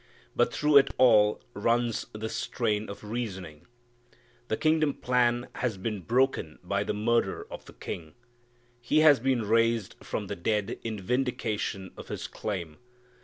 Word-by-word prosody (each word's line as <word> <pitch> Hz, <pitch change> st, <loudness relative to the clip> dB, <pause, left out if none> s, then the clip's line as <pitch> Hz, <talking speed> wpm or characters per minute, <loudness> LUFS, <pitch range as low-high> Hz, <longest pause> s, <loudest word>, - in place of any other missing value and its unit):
But -, -, +3 dB
through 150 Hz, -1 st, +4 dB
it 140 Hz, 0 st, +7 dB
all 105 Hz, -5 st, +5 dB
runs 115 Hz, +2 st, 0 dB
this 110 Hz, +1 st, -5 dB
strain 110 Hz, -3 st, -1 dB
of 100 Hz, -, -8 dB
reasoning: 95 Hz, -8 st, -5 dB, 0.8 s
the 110 Hz, -, -1 dB
kingdom 155 Hz, -2 st, +2 dB
plan 120 Hz, -1 st, +1 dB
has 120 Hz, -5 st, -1 dB
been 105 Hz, +1 st, -3 dB
broken 120 Hz, -, +1 dB
by 100 Hz, +2 st, 0 dB
the 105 Hz, -, -2 dB
murder 115 Hz, +3 st, 0 dB
of -, -, -8 dB
the -, -, -13 dB
King. 80 Hz, -2 st, -7 dB, 0.7 s
He 150 Hz, +5 st, +3 dB
has 150 Hz, -4 st, +7 dB
been 130 Hz, -1 st, +1 dB
raised 115 Hz, -1 st, +2 dB
from -, -, -4 dB
the -, -, -5 dB
dead 105 Hz, +3 st, -1 dB
in 110 Hz, -2 st, -4 dB
vindication 105 Hz, -4 st, -2 dB
of -, -, -10 dB
His -, -, -5 dB
claim. 85 Hz, -7 st, -5 dB
110 Hz, 150 wpm, -28 LUFS, 100-125 Hz, 0.8 s, it